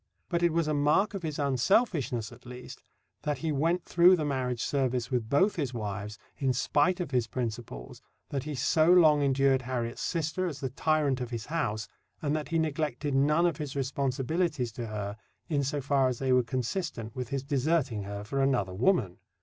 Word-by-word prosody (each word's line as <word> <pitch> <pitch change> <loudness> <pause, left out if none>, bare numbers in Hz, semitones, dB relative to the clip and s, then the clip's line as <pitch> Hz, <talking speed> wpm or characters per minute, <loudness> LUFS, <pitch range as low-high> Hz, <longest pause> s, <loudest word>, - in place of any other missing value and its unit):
But 170 -1 0
it 170 -1 +3
was 165 -1 +1
a 155 - +1
mark 150 +9 +2
of 195 - -4
his 155 -3 -4
unselfishness, 140 - +1
at 120 +1 -15
least, 125 0 -9 0.4
that 150 -1 -1
he 160 -1 -2
went 165 +5 0
through 175 +2 +6
the 155 -4 -2
marriage 130 -4 -1
service 130 -3 -1
with 120 -3 -1
both 190 +10 +3
his 135 -6 -2
wives, 105 -1 -4 0.2
in 135 -2 +1
spite 145 +8 +2
of 170 -6 -3
his 125 -3 +1
principles, 115 - -5 0.3
that 140 -1 -3
he 150 -1 -4
so 155 +6 +3
long 155 -5 +6
endured 135 -1 +3
Harriet's 120 -2 -3
sister 170 +2 -1
as 145 -5 -5
the 130 -2 -3
tyrant 145 -2 +1
of 125 - -3
his 115 -2 -5
house, 110 -10 -2 0.3
and 150 0 -1
that 155 -1 -3
he 165 - 0
neglected 150 -3 -1
none 150 +5 +3
of 170 -4 +1
his 145 -3 -5
responsibilities 135 +1 -1
to 115 +1 -6
her, 105 -1 -4 0.3
in 145 -3 +1
so 145 +2 -1
far 135 -1 +2
as 125 -2 -1
they 130 0 +1
were 125 - +5
consistent 125 - -3
with 125 -2 -4
his 135 -1 -2
deserting 140 -4 0
her 100 +1 -6
for 135 +6 -2
another 125 -9 +1
woman. 105 - +1
135 Hz, 195 wpm, -29 LUFS, 125-155 Hz, 0.4 s, through